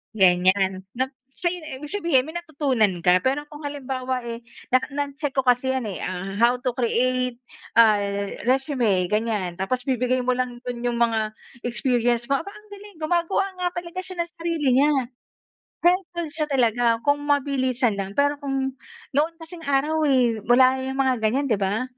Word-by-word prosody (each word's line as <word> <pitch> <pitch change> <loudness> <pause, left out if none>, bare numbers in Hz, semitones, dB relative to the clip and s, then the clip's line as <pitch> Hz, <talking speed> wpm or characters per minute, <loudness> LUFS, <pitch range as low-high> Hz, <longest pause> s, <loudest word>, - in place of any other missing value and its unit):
Ganyan. 190 0 +3
Nap 260 +2 -1 0.2
sa'yo 345 +4 -3 0.2
ibig 290 +2 -8
sabihin, 330 -10 +2
may 315 - -8
natutunan 275 - 0
ka. 180 +1 +5
Pero 275 +5 0
kung 295 0 -10
halimbawa, 260 -3 -3
eh, 235 0 -5 0.3
nak 255 - +3
na-check 285 0 -3
ko 265 - +2
kasi 250 +1 +3
yan, 260 -3 -1
eh. 195 -4 -5
Ah 185 +1 -4
how 240 +1 +5
to 250 -1 -2
create, 250 0 0 0.4
ay, 200 -3 +3
resume, 255 -8 +2
ganyan. 210 -3 -1
Tapos 250 +6 -2
bibigay 255 -1 0
mo 255 - +3
lang 250 -1 -2
dun 245 -1 -4
yung 240 -1 -1
mga 220 -2 +1 0.3
experience 240 -1 0
mo. 275 +4 +1
Aba, 400 - -9
ang 420 +1 -15
galing! 405 -3 -12
Gumagawa 340 +4 +1 0.2
nga 355 - +2
talaga 350 +1 -5
siya 370 -1 -10
ng 340 - -24
sarili 335 -4 -2
niya. 295 - +4 0.9
Helpful 350 -1 +1
siya 310 -1 -2
talaga. 235 -3 +2
Kung 285 0 +2
mabilisan 260 -6 +1
lang. 195 +1 -4
Pero 285 0 +2
kung 270 -1 -2 0.4
noon 305 +4 +1
kasing 325 0 -10
araw, 300 +3 +2
eh, 245 -5 +3
wala 255 +2 +5
yang 265 0 -4
mga 260 -2 +1
ganyan, 230 +6 +1
'di 210 - +2
ba? 200 +4 0
255 Hz, 170 wpm, -24 LUFS, 230-290 Hz, 0.9 s, ka